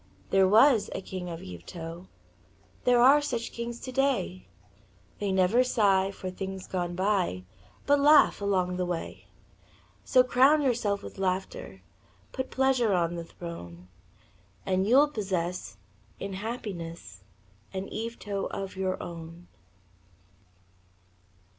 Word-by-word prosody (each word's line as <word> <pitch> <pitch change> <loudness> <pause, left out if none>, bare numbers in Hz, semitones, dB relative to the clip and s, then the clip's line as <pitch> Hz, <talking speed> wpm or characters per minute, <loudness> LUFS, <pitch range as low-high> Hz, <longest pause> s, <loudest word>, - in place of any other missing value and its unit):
There 190 -1 +5
was 225 +3 +5
a - - -3
king 185 -2 -6
of 165 -1 -7
Yvetot 165 - -8 0.8
There 245 -1 +5
are 275 +4 +7
such 240 -5 -3
kings 235 0 -5
today; 255 - -1 0.7
They 205 -1 -1
never 190 +6 +4
sigh 195 -6 +2
for 185 -1 -6
things 190 0 -6
gone 175 -2 -3
by 185 - 0 0.4
But 285 0 +4
laugh 295 -5 +6
along 185 -3 0
the 180 - 0
way. 175 -2 -5 0.8
So, 255 -1 +5
crown 270 +4 +4
yourself 225 -6 0
with - - -9
laughter, 190 - -3 0.5
Put 260 0 -4
pleasure 260 -5 +2
on 170 -1 +1
the 170 -1 -5
throne, 90 - -9 0.8
And 190 +1 +1
you'll 275 +6 +6
possess 180 - -3 0.4
in 195 0 -5
happiness 175 - -6 0.5
An 190 +1 -4
Yvetot 215 -3 -4
of 195 -1 -5
your 190 0 -1
own. 170 0 -9
195 Hz, 120 wpm, -28 LUFS, 175-235 Hz, 0.8 s, are